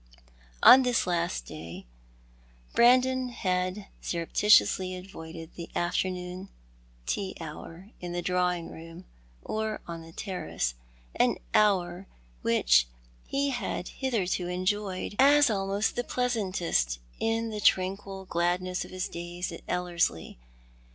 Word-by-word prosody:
On 265 - +10
this 250 -2 +1
last 175 0 -1
day, 80 +1 -9 0.9
Brandon 255 +1 +4
had 185 -3 -1 0.2
scrupulously 185 +1 +3
avoided 165 -3 -9
the 170 - -8
afternoon 180 +1 -2 0.6
tea 195 - -2
hour 165 +4 -9
in 175 -1 -6
the 175 0 -3
drawing 180 -1 0
room 165 +2 -11 0.4
or 220 0 -2
on 170 -1 -6
the 165 0 -12
terrace, 170 - -3 0.4
an - - +3 0.2
hour 190 -3 +2 0.3
which - - +4 0.4
he 280 0 0
had 240 -7 -3
hitherto 195 -9 -1
enjoyed 185 +2 -2
as 285 -1 +6
almost 195 +1 0
the 245 - -1
plcasantest 190 - 0 0.2
in 225 0 0
the 210 -1 -4
tranquil 190 +1 +1
gladness 180 +1 0
of - - -11
his 185 0 -3
days 175 +1 -5
at 165 - -8
Ellerslie. 175 - -1
185 Hz, 115 wpm, -28 LUFS, 175-210 Hz, 0.9 s, On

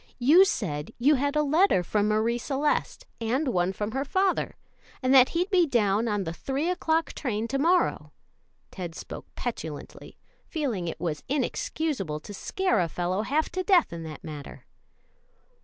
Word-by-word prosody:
"You 305 +10 +6
said 150 - -2
you 275 +5 +4
had 285 +1 0
a 300 - +3
letter 305 - +3
from 210 +3 +1
Marie 220 +3 +1
Celeste 295 - -1
and 250 +6 0
one 180 -6 +1
from 210 +3 -4
her 270 +3 -1
father, 380 +6 0 0.5
and 255 +1 +3
that 260 -1 +7
he'd 360 +4 0
be 360 -3 +4
down 220 -3 +2
on 205 -2 0
the 165 -2 -4
three 275 - -2
o'clock 325 -2 0
train 230 -5 -2
to 275 - -1
morrow." 350 +5 +2 0.6
Ted 175 -3 -6
spoke - - -8
petulantly, 160 - -6 0.3
feeling 245 - -3
it 165 - -5
was 160 -3 -3
inexcusable 265 - -2
to 205 - -9
scare 375 - 0
a 175 - +2
fellow 180 +4 -1
half 290 +8 0
to 370 - -2
death 365 - +3
in 170 - -6
that 155 -3 -8
manner. 150 -2 -9
245 Hz, 165 wpm, -27 LUFS, 185-305 Hz, 0.6 s, that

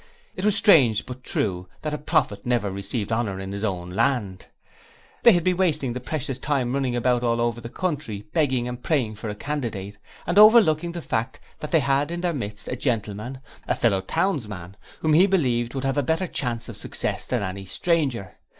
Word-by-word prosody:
It 185 - -5
was 210 -1 +3
strange 130 - +5
but 130 0 -9
true 90 -6 -1 0.2
that 155 -1 -2
a 150 - -3
prophet 100 -8 0
never 120 -5 0
received 100 +3 -4
honour 110 -4 -1
in 95 0 -6
his 100 +1 -5
own 90 -4 -2
land. 110 -3 0 0.7
They 235 - +8
had 175 -2 +2
been 180 0 +1
wasting 155 -9 +1
the 125 - -4
precious 130 0 -4
time 130 -3 0
running 135 -3 0
about 120 0 +2
all 115 -1 +1
over 120 0 0
the 115 - -7
country, 145 - -3
begging 130 -7 +1
and 125 0 -6
praying 125 -10 0
for 110 - -5
a 105 - -4
candidate, 105 -7 -4 0.3
and 180 - +3
overlooking 185 -7 +6
the 170 -2 -6
fact 115 +3 -2 0.2
that 150 - -5
they 160 - +3
had 140 +2 +1
in 170 0 -4
their 175 -1 0
midst 105 -7 -5
a - - -2
gentleman 120 0 -3 0.3
a - - +1
fellow 100 -5 +2
townsman, 105 - -2 0.3
who, 160 - +2
he 175 +6 +6
believed, 125 -10 +1
would 135 - -3
have 135 +1 +1
a - - +3
better 160 +6 0
chance 120 -8 -3
of - - -8
success - - -3
than - - 0
any 95 +1 -5
stranger. 135 - -1
125 Hz, 200 wpm, -24 LUFS, 105-150 Hz, 0.7 s, They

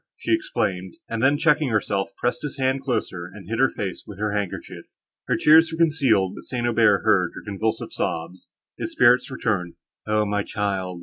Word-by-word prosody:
she - - -1
exclaimed; 95 - -2
and 115 -1 -3
then, 135 +3 +4
checking 150 -2 +2
herself, 100 -3 0
pressed 120 - -1
his 150 - -5
hand 130 0 0
closer, 110 -9 -3
and 100 -4 -12
hid 115 +2 -3
her 135 - +5
face 95 -3 -5
with 105 - -9
her 105 +1 -1
handkerchief. 100 -3 -5 0.4
Her - - +1
tears 160 +2 +6
were 160 - -5
concealed, 135 - +2
but - - -11
St. 120 -2 -3
Aubert 110 -4 +3
heard 95 -5 +2
her - - -9
convulsive 110 +2 -3
sobs. 85 +3 -4 0.3
His - - -4
spirits 125 +3 +4
returned. 105 -9 -2 0.3
"O 105 0 +2
my 105 0 0
child!" 95 -4 -3
110 Hz, 185 wpm, -23 LUFS, 95-130 Hz, 0.4 s, tears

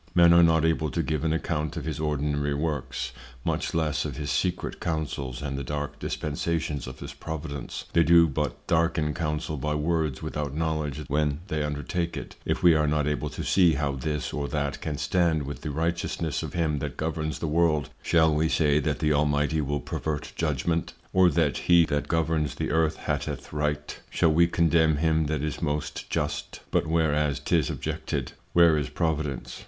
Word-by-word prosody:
Men 85 -1 +7
are 85 - +7
not 80 -1 +4
able 80 -1 +1
to 85 +3 -1
give 75 0 -1
an 80 - +1
account 80 -2 -2
of - - -4
his 80 -1 -3
ordinary 75 -1 0
Works, 75 -3 -2 0.3
much - - -1
less 80 -2 +1
of 75 -4 -5
his 75 -1 -3
secret 90 -2 -1
Counsels, 70 -5 -3
and 70 -1 -3
the - - -4
dark 75 +2 -4
Dispensations 75 -2 -2
of 65 0 -9
his - - -6
Providence: 75 -3 -6
They 85 - +5
do 85 0 +6
but 75 0 -3
darken 80 -2 +1
Counsel 75 -1 -2
by 75 +3 -1
Words 75 -3 0
without 75 -2 -3
Knowledge 75 -2 -1
when 75 +1 0
they 80 -3 -1
undertake 75 +4 -2
it: - - -7
If - - -1
we 85 -2 +8
are 75 -1 +2
not 75 0 +1
able 75 0 -1
to 75 - -6
see 90 -4 +4
how 70 0 0
this 70 0 -3
or 70 -1 -2
that 70 -2 -2
can 75 -2 -3
stand 85 -3 +1
with 70 +1 -6
the 75 - -4
Righteousness 80 0 -1
of - - -6
him 80 -4 0
that 70 -3 -5
governs 80 0 -2
the - - -4
World, 75 -2 +2
shall 80 -2 +4
we 80 +1 +2
say 75 -3 +3
that 75 -2 -1
the 75 0 +2
Almighty 75 +1 +2
will 75 0 -1
pervert 75 -2 -4
Judgment? 80 +2 -1 0.2
or 95 -1 +6
that 80 -6 +1
he 85 -1 +7
that 75 -1 -1
governs 80 -3 0
the - - -2
Earth 80 0 +2
hateth - - -3
Right? 75 0 -2
Shall 80 -3 +3
we 85 +2 +5
condemn 80 -2 +3
him 80 0 +2
that 75 -1 -1
is 75 0 -3
most 75 -2 -3
just? 75 0 -3
But - - +1
whereas 75 -3 +1
'tis 80 -6 +1
objected; - - -3 0.2
where 85 -3 +6
is 75 - -3
Providence? 75 -5 -2
75 Hz, 190 wpm, -27 LUFS, 75-80 Hz, 0.3 s, we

